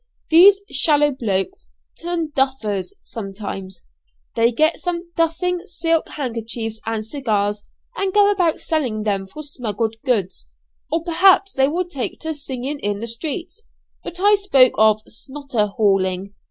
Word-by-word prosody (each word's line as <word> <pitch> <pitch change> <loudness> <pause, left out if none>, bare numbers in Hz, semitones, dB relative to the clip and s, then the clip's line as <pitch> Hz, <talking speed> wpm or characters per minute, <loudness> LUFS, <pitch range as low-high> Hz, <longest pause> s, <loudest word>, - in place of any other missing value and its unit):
These 385 +5 +7
'shallow 290 +1 +4
blokes' 195 - -2 0.3
turn 335 -2 -2
'duffers' 220 -9 -1
sometimes. 195 -3 -7 0.5
They 230 +1 +3
get 310 +7 +2
some 345 -1 -4
'duffing' 340 +2 0
silk 330 0 0
handkerchiefs 230 -4 -4
and 225 -1 -2
cigars, 210 -5 -1 0.3
and 390 -1 0
go 410 +1 +5
about 355 -5 +1
selling 250 -10 -1
them 195 -2 -1
for 305 +10 -9
smuggled 225 -5 -3
goods; 200 - -1 0.4
or 330 +1 0
perhaps 375 +3 +4
they 270 0 +3
will 350 +5 -1
take 280 -8 -4
to 320 0 -2
singing 280 -1 -5
in 205 -3 -2
the 230 - -4
streets. 310 - -5 0.4
But 350 - -8
I 410 +2 +5
spoke 335 -12 +4
of 215 0 +4
'snotter 265 -3 -3
hauling.' 195 -2 0
265 Hz, 140 wpm, -21 LUFS, 215-330 Hz, 0.5 s, These